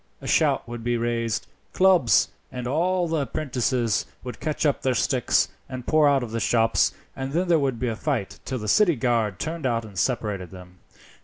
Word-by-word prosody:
A - - -12
shout - - +2
would 120 -1 -7
be 120 0 0
raised 115 -1 -1
of - - -37
'Clubs!' 185 -10 +4 0.2
and 125 -2 -5
all 175 +7 +1
the 155 -4 -1
'prentices 125 -5 -1 0.2
would 125 -1 -7
catch 155 +1 -2
up 145 - +1
their 130 -1 +1
sticks 125 0 +2 0.2
and 130 -2 -6
pour 155 -2 +4
out 135 -2 +2
of 115 - -6
the 115 - -2
shops, 115 +1 +2 0.2
and 135 +1 -5
then 180 +3 +1
there 165 -2 +5
would 135 -4 0
be 125 - -1
a 115 - -1
fight 105 -2 -3
till 130 - -3
the 105 -2 -6
city 175 - +4
guard 115 -6 0
turned 160 - -3
out 115 -2 -1
and 100 -4 -7
separated 105 -7 -1
them. 90 -1 -13
125 Hz, 205 wpm, -24 LUFS, 115-145 Hz, 0.2 s, there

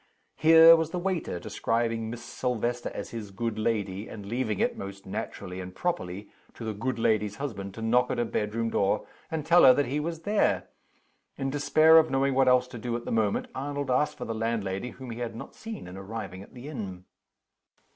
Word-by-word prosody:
Here 165 +1 +8
was 160 -1 0
the 180 - -4
waiter 175 - -2
describing 115 +4 -1
Miss 120 0 -7
Silvester 120 -1 -2
as 100 - -7
his 110 -3 -6
"good 110 +2 -3
lady;" 105 -2 -1
and 105 -2 -9
leaving 110 -1 -2
it - - +1
(most 100 0 -8
naturally 95 -1 -5
and 90 0 -9
properly) 105 - -3 0.2
to - - -8
the 110 - -2
"good 115 +4 -2
lady's" 105 -2 +1
husband 100 -7 -5
to 115 - -6
knock 125 +2 +3
at - - -1
her 120 - +1
bedroom 115 +1 -1
door, 100 0 +1 0.2
and 160 -2 -3
tell 170 +2 +6
her 130 -1 +9
that 145 - +2
he 140 +5 -1
was 165 +1 -4
there. 210 0 +1 0.7
In 135 -1 -2
despair 155 +3 +6
of 160 - +2
knowing 135 0 +2
what 135 0 +3
else 125 0 +5
to 120 - -8
do 120 +1 -2
at 120 - -9
the - - -4
moment, 110 -3 +1
Arnold 140 0 -3
asked 140 +4 +1
for - - -5
the 115 - -3
landlady, 110 -1 -2
whom 130 -1 -9
he 115 - -6
had 115 -2 -4
not 115 - -8
seen 220 - -8
on 90 - -9
arriving 95 -1 -6
at 100 - -14
the 125 +3 -9
inn. 100 -11 -6
115 Hz, 205 wpm, -28 LUFS, 105-140 Hz, 0.7 s, her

